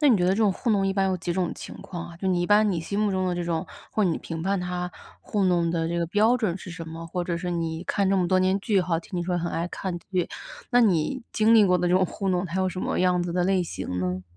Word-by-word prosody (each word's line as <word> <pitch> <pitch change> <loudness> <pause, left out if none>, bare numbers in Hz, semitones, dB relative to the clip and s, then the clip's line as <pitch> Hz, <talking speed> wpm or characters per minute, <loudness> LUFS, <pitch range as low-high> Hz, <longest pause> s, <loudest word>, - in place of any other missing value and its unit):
那 295 - +5
你 235 - +6
觉 180 - +1
得 185 - +3
这 - - 0
种 210 -3 +3
糊 240 - -4
弄 200 -2 +2
一 195 - +1
般 195 -1 +1
有 185 - 0
几 175 0 -3
种 180 -1 -1
情 - - -9
况 175 -2 -7
啊， 170 - -12
就 190 +1 -1
你 175 -1 +2
一 - - 0
般 210 0 +5
你 180 - -1
心 200 +5 -3
目 210 -1 +2
中 185 -1 0
的 180 - 0
这 175 - -2
种 170 -2 -2 0.2
或 215 - +1
你 170 -3 +1
评 165 -1 -6
判 195 +1 0
他 180 0 -3 0.3
糊 205 - -1
弄 175 -2 +2
的 165 -1 -1
这 170 0 -1
个 170 - 0
标 215 +7 +3
准 205 -7 -1
是 185 - -9
什 165 -1 -7
么？ 165 +1 -7
或 175 +1 -3
者 175 - -2
是 180 +1 -3
你 165 -1 -2
看 195 0 +1
这 195 - +3
么 180 -2 +2
多 185 - +4
年 185 +1 +2
剧 205 -1 +2
吼， 175 -2 0
听 180 +1 -6
你 - - -1
说 180 0 -1
很 170 0 -2
爱 165 +1 -2
看 180 -2 -4
剧， 180 0 -2 0.4
那 245 -1 +5
你 195 - +1
经 220 +1 +4
历 215 -2 +7
过 180 -1 +3
的 175 0 +1
这 180 - +3
种 185 0 +4
糊 195 +2 -3
弄， 180 0 +1
它 185 +2 -2
有 185 - +2
什 185 - -6
么 - - -1
样 180 -1 +2
子 175 -1 -3
的 180 - +1
类 190 -1 +2
型 90 - -4
呢？ 90 0 -2
180 Hz, 335 characters per minute, -25 LUFS, 170-195 Hz, 0.4 s, 历